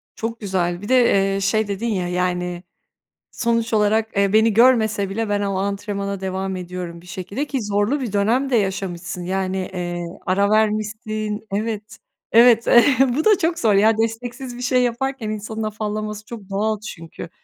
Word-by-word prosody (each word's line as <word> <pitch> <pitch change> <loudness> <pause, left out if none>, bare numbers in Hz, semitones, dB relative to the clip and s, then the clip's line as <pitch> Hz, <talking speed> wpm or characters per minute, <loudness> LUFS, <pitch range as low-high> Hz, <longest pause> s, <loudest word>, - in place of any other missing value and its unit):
Çok 230 0 -4
güzel. 180 -3 -1
Bir 205 - -7
de, 215 -6 +4
ııı, 195 - -2
şey 215 +2 +1
dedin 205 +3 -3
ya, 185 -6 -1
yani 180 0 -2 0.7
sonuç 230 -1 0
olarak, 215 0 +1
eee, 200 0 +2
"Beni 220 0 +4
görmese 220 -4 +4
bile 220 +2 -2
ben 205 0 0
o 200 -1 -1
antrenmana 200 0 -3
devam 190 0 -3
ediyorum 180 -2 -6
bir 180 - -17
şekilde." 200 +8 -4
ki 270 -3 -2
zorlu 205 +7 0
bir 235 -6 -4
dönem 230 +7 +1
de 255 - +2
yaşamışsın 185 -3 -2
yani, 190 +1 -2 0.2
eee, 175 -1 -3 0.2
ara 200 +2 +2
vermişsin 215 0 -1
Evet 215 +1 -3 0.3
evet. 235 0 +6
Eh 245 +1 +5 0.2
bu 310 - 0
da 425 -2 +6
çok 335 -1 0
zor 220 -3 +3
ya 215 +3 +4
desteksiz 240 +3 -3
bir - - -7
şey 250 0 +2
yaparken 245 -1 -2
insanın 215 +1 -4
afallaması 215 0 -4
çok 215 -3 -10
doğal 210 +2 -1
çünkü. 170 -5 -9
210 Hz, 170 wpm, -21 LUFS, 195-230 Hz, 0.7 s, evet